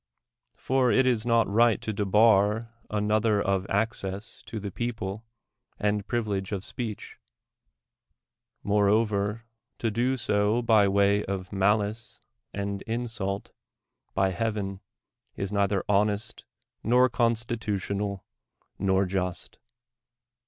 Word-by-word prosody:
For 130 Hz, -1 st, +1 dB
it 130 Hz, -, +4 dB
is 120 Hz, -2 st, +1 dB
not 115 Hz, -1 st, +3 dB
right 115 Hz, +1 st, +3 dB
to 110 Hz, -, -3 dB
debar 105 Hz, +2 st, +3 dB, 0.2 s
another 105 Hz, 0 st, +1 dB
of 95 Hz, -1 st, 0 dB
access 100 Hz, 0 st, -2 dB
to 110 Hz, -, -5 dB
the 100 Hz, -1 st, -5 dB
people 110 Hz, -1 st, -4 dB, 0.5 s
and 105 Hz, -1 st, -1 dB
privilege 105 Hz, -5 st, -2 dB
of 100 Hz, -2 st, -3 dB
speech; 115 Hz, -4 st, -6 dB, 1.4 s
moreover, 105 Hz, +1 st, +2 dB, 0.3 s
to 115 Hz, -, -1 dB
do 125 Hz, +5 st, +1 dB
so 105 Hz, +1 st, +1 dB
by 110 Hz, -3 st, +5 dB
way 100 Hz, +1 st, +3 dB
of 95 Hz, 0 st, -4 dB
malice 105 Hz, +3 st, 0 dB, 0.3 s
and 100 Hz, 0 st, -3 dB
insult 110 Hz, -4 st, -3 dB, 0.3 s
— -, -, -52 dB
by 95 Hz, 0 st, +2 dB
heaven! 100 Hz, -1 st, -2 dB, 0.6 s
is 100 Hz, 0 st, -4 dB
neither 100 Hz, -1 st, +1 dB
honest, 105 Hz, +2 st, 0 dB, 0.4 s
nor 125 Hz, +2 st, +4 dB
constitutional, 110 Hz, -5 st, -1 dB, 0.5 s
nor 95 Hz, 0 st, +2 dB
just. 90 Hz, -2 st, -3 dB
105 Hz, 110 wpm, -27 LUFS, 100-115 Hz, 1.4 s, by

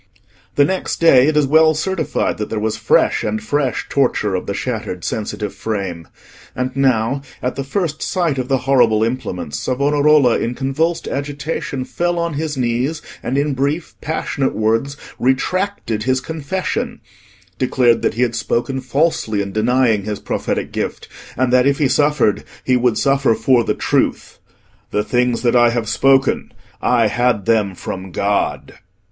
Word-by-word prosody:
The 145 Hz, -, +5 dB
next 190 Hz, +4 st, -2 dB
day 140 Hz, -6 st, +6 dB
it 155 Hz, -1 st, +1 dB
is 150 Hz, -, +4 dB
well 160 Hz, +2 st, +4 dB
certified 165 Hz, -, -1 dB
that 105 Hz, -, -3 dB
there 110 Hz, -, -3 dB
was 110 Hz, 0 st, -1 dB
fresh -, -, +2 dB
and 110 Hz, 0 st, -1 dB
fresh 130 Hz, +4 st, -1 dB
torture 125 Hz, -7 st, +1 dB
of 90 Hz, -, -3 dB
the 100 Hz, -, -2 dB
shattered 110 Hz, -8 st, -4 dB
sensitive 105 Hz, -1 st, -3 dB
frame; 95 Hz, -7 st, -4 dB, 0.5 s
and 125 Hz, 0 st, -3 dB
now, 130 Hz, -1 st, +1 dB, 0.2 s
at 125 Hz, -, -3 dB
the 135 Hz, -, -3 dB
first 155 Hz, +2 st, -2 dB
sight 170 Hz, -7 st, 0 dB
of 125 Hz, -, -2 dB
the 130 Hz, -2 st, 0 dB
horrible 120 Hz, -5 st, +4 dB
implements, 95 Hz, -, -3 dB
Savonarola, 145 Hz, 0 st, +3 dB
in 120 Hz, +2 st, -2 dB
convulsed 155 Hz, +6 st, -1 dB
agitation, 140 Hz, -1 st, -3 dB
fell 175 Hz, +4 st, -1 dB
on 170 Hz, -1 st, -1 dB
his 150 Hz, 0 st, -3 dB
knees, 125 Hz, +5 st, -1 dB, 0.2 s
and 125 Hz, +3 st, -2 dB
in 145 Hz, 0 st, +1 dB
brief 140 Hz, +5 st, -2 dB
passionate 140 Hz, -3 st, -2 dB
words 115 Hz, +6 st, 0 dB, 0.2 s
retracted 130 Hz, -, 0 dB
his 130 Hz, +3 st, +1 dB
confession, 160 Hz, +6 st, -3 dB, 0.6 s
declared 125 Hz, -2 st, +3 dB
that -, -, 0 dB
he 120 Hz, -, +2 dB
had 120 Hz, -1 st, 0 dB
spoken 120 Hz, +4 st, -1 dB
falsely 130 Hz, -5 st, 0 dB
in 100 Hz, -1 st, -2 dB
denying 115 Hz, -1 st, +2 dB
his 105 Hz, -1 st, -3 dB
prophetic -, -, -3 dB
gift, -, -, -4 dB, 0.3 s
and 125 Hz, 0 st, +1 dB
that 125 Hz, +1 st, +5 dB
if 140 Hz, 0 st, +2 dB
he 145 Hz, -, +2 dB
suffered, 140 Hz, -5 st, +2 dB, 0.2 s
he 130 Hz, -, +2 dB
would 125 Hz, -2 st, +2 dB
suffer 135 Hz, -4 st, +2 dB
for 120 Hz, +2 st, +3 dB
the -, -, -1 dB
truth—"The 105 Hz, -, -3 dB
things 125 Hz, +1 st, 0 dB
that 120 Hz, 0 st, +2 dB
I 120 Hz, -1 st, +6 dB
have 115 Hz, -1 st, -2 dB
spoken, 135 Hz, +4 st, +2 dB, 0.3 s
I 120 Hz, -2 st, +3 dB
had 120 Hz, -1 st, +1 dB
them 105 Hz, -4 st, +1 dB
from 95 Hz, +2 st, -6 dB
God." 100 Hz, +3 st, -1 dB
130 Hz, 160 wpm, -18 LUFS, 115-145 Hz, 0.6 s, day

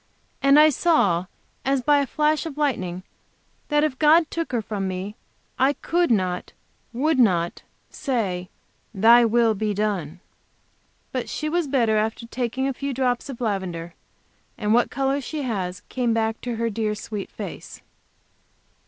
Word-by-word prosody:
And 275 Hz, +1 st, +6 dB
I 305 Hz, +1 st, +8 dB
saw, 200 Hz, -, +2 dB, 0.4 s
as 270 Hz, -1 st, +1 dB
by 290 Hz, +1 st, +4 dB
a 280 Hz, -, 0 dB
flash 305 Hz, +4 st, +1 dB
of 295 Hz, -3 st, -8 dB
lightning, 185 Hz, -12 st, -1 dB, 0.6 s
that 295 Hz, -1 st, +2 dB
if 290 Hz, -4 st, -1 dB
God 315 Hz, +1 st, +5 dB
took 330 Hz, -4 st, -3 dB
her 240 Hz, -, 0 dB
from 205 Hz, -3 st, -3 dB
me, 190 Hz, +3 st, -4 dB, 0.4 s
I 270 Hz, +2 st, +4 dB
could 345 Hz, +4 st, 0 dB
not, 185 Hz, -5 st, 0 dB, 0.4 s
should 275 Hz, +4 st, +1 dB
not 175 Hz, -7 st, +2 dB, 0.3 s
say: 200 Hz, -10 st, -2 dB, 0.5 s
Thy 230 Hz, +4 st, +7 dB
will 230 Hz, 0 st, +3 dB
be 210 Hz, 0 st, -2 dB
done. 190 Hz, -6 st, -2 dB, 0.9 s
But -, -, -3 dB
she 305 Hz, -, -3 dB
was 340 Hz, -1 st, 0 dB
better 235 Hz, -6 st, +2 dB
after 220 Hz, +2 st, -1 dB
taking 250 Hz, +2 st, -2 dB
a 275 Hz, -, -1 dB
few 275 Hz, 0 st, -4 dB
drops 250 Hz, +1 st, 0 dB
of 260 Hz, -, -7 dB
lavender, 185 Hz, -6 st, -3 dB, 0.6 s
and 210 Hz, 0 st, +1 dB
what 240 Hz, +1 st, +3 dB
color 275 Hz, +1 st, 0 dB
she 295 Hz, +2 st, -4 dB
has 185 Hz, -7 st, -3 dB
came 240 Hz, -3 st, 0 dB
back 225 Hz, 0 st, -1 dB
to 245 Hz, -2 st, -3 dB
her 230 Hz, 0 st, -1 dB
dear 215 Hz, 0 st, -1 dB
sweet 210 Hz, -1 st, -6 dB
face. -, -, -8 dB
235 Hz, 155 wpm, -23 LUFS, 205-275 Hz, 0.9 s, I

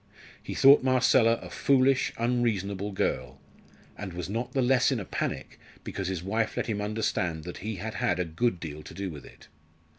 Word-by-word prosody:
He -, -, -6 dB
thought 140 Hz, +2 st, +7 dB
Marcella 130 Hz, -2 st, +4 dB
a -, -, -9 dB
foolish, 135 Hz, -1 st, +3 dB
unreasonable 105 Hz, -5 st, 0 dB
girl, 65 Hz, -8 st, -2 dB, 0.6 s
and 95 Hz, -3 st, -7 dB
was 90 Hz, +2 st, -5 dB
not 115 Hz, +3 st, -3 dB
the 135 Hz, -, +1 dB
less 125 Hz, +1 st, +3 dB
in 130 Hz, -, 0 dB
a 100 Hz, -, -5 dB
panic 65 Hz, -, -4 dB, 0.2 s
because 100 Hz, -2 st, -4 dB
his 95 Hz, -3 st, -3 dB
wife 110 Hz, +3 st, -1 dB
let -, -, 0 dB
him 105 Hz, -3 st, -2 dB
understand 105 Hz, -6 st, -1 dB
that 90 Hz, +1 st, -7 dB
he 110 Hz, +2 st, -4 dB
had 105 Hz, +4 st, -5 dB
had 90 Hz, -3 st, 0 dB
a 90 Hz, -, +1 dB
good 90 Hz, +5 st, -1 dB
deal 75 Hz, -2 st, -7 dB
to 75 Hz, -, -11 dB
do 95 Hz, -1 st, -4 dB
with 75 Hz, -2 st, -10 dB
it. -, -, -17 dB
105 Hz, 190 wpm, -28 LUFS, 90-120 Hz, 0.6 s, thought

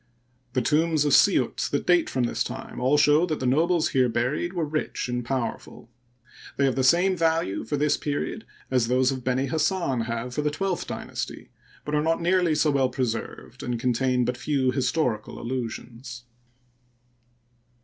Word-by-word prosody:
The 130 Hz, -1 st, +1 dB
tombs 155 Hz, +2 st, +2 dB
of 145 Hz, -, +2 dB
Siut -, -, +3 dB
that -, -, -1 dB
date 175 Hz, -2 st, +3 dB
from 130 Hz, -, -1 dB
this 120 Hz, -, 0 dB
time -, -, -7 dB
all 130 Hz, +4 st, +3 dB
show 150 Hz, +3 st, +4 dB
that 155 Hz, -3 st, -2 dB
the 130 Hz, -, -3 dB
nobles 160 Hz, +6 st, +2 dB
here 130 Hz, -2 st, +2 dB
buried 125 Hz, +9 st, -1 dB
were 170 Hz, -3 st, -1 dB
rich 155 Hz, -3 st, -3 dB
and 125 Hz, 0 st, -2 dB
powerful. 120 Hz, -1 st, -4 dB, 0.7 s
They 140 Hz, -, +3 dB
have 135 Hz, -, +1 dB
the 130 Hz, -, +1 dB
same 180 Hz, +7 st, +4 dB
value 165 Hz, -, 0 dB
for 145 Hz, -, -2 dB
this 150 Hz, +1 st, +2 dB
period 145 Hz, +9 st, -3 dB, 0.3 s
as 125 Hz, -3 st, +2 dB
those 130 Hz, +2 st, +2 dB
of 130 Hz, -2 st, -5 dB
Benihassan 135 Hz, -, 0 dB
have 115 Hz, +2 st, -4 dB
for 150 Hz, -, -1 dB
the 150 Hz, -, +1 dB
twelfth 180 Hz, +4 st, -2 dB
dynasty, -, -, -6 dB, 0.3 s
but 150 Hz, -, -4 dB
are 150 Hz, -, +2 dB
not 165 Hz, +2 st, +1 dB
nearly 175 Hz, -1 st, +2 dB
so 150 Hz, 0 st, +2 dB
well 135 Hz, -2 st, +2 dB
pre 130 Hz, -, -1 dB
served, 115 Hz, +2 st, -6 dB
and 120 Hz, -1 st, -3 dB
contain 125 Hz, +1 st, +1 dB
but 125 Hz, 0 st, -2 dB
ifew 130 Hz, -3 st, 0 dB
historical 125 Hz, -4 st, -1 dB
allusions. 120 Hz, 0 st, -6 dB
135 Hz, 170 wpm, -25 LUFS, 125-155 Hz, 0.7 s, show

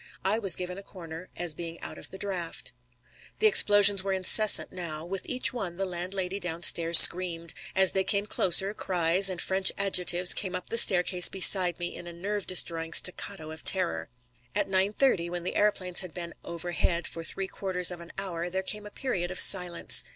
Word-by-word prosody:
I 205 Hz, +4 st, -1 dB
was 195 Hz, -6 st, -1 dB
given 180 Hz, +1 st, -8 dB
a -, -, -11 dB
corner, 170 Hz, -3 st, -13 dB
as 175 Hz, -2 st, -1 dB
being 165 Hz, +1 st, -10 dB
out -, -, -10 dB
of -, -, -7 dB
the 190 Hz, -, -12 dB
draft. 180 Hz, -10 st, -7 dB, 0.6 s
The -, -, -3 dB
explosion 205 Hz, -, +5 dB
were 195 Hz, 0 st, -4 dB
incessant 195 Hz, +3 st, +3 dB
now. 165 Hz, -4 st, -8 dB
With 190 Hz, +2 st, -6 dB
each 255 Hz, 0 st, +3 dB
one 190 Hz, -8 st, -7 dB
the 195 Hz, -, -4 dB
landlady 185 Hz, +2 st, -6 dB
downstairs 170 Hz, -1 st, +3 dB
screamed. 170 Hz, -2 st, +6 dB, 0.2 s
As 190 Hz, -1 st, +3 dB
they 190 Hz, -, -2 dB
came 200 Hz, +1 st, -1 dB
closer, 195 Hz, 0 st, +2 dB
cries 180 Hz, 0 st, 0 dB
and 185 Hz, -2 st, -6 dB
French 190 Hz, +1 st, +3 dB
adjectives 180 Hz, -2 st, +1 dB
came 185 Hz, -2 st, -3 dB
up 180 Hz, -, -9 dB
the 230 Hz, -, -4 dB
staircase 180 Hz, -3 st, +4 dB
beside 185 Hz, -2 st, +4 dB
me 175 Hz, 0 st, -6 dB
in 175 Hz, -, -11 dB
a 170 Hz, -, -10 dB
nerve 200 Hz, +3 st, -7 dB
destroying 165 Hz, -2 st, -1 dB
staccato 180 Hz, -3 st, +1 dB
of 160 Hz, -, -11 dB
terror. 80 Hz, -, -1 dB, 0.5 s
At 205 Hz, -, -2 dB
nine 190 Hz, +1 st, -1 dB
thirty, 210 Hz, -8 st, -2 dB
when 175 Hz, 0 st, -7 dB
the 180 Hz, -, -5 dB
aëroplanes 190 Hz, -4 st, -2 dB
had 185 Hz, -3 st, -3 dB
been 170 Hz, -1 st, -8 dB
overhead 170 Hz, 0 st, -4 dB
for 165 Hz, -, -6 dB
three 195 Hz, +3 st, -4 dB
quarters 185 Hz, -2 st, -1 dB
of 175 Hz, -1 st, -10 dB
an 170 Hz, -, -14 dB
hour, 175 Hz, -3 st, -6 dB
there 190 Hz, +1 st, -5 dB
came 210 Hz, +2 st, -7 dB
a -, -, -12 dB
period 200 Hz, -7 st, -6 dB
of 185 Hz, -, -5 dB
silence. 180 Hz, -3 st, +1 dB
180 Hz, 195 wpm, -25 LUFS, 170-195 Hz, 0.6 s, screamed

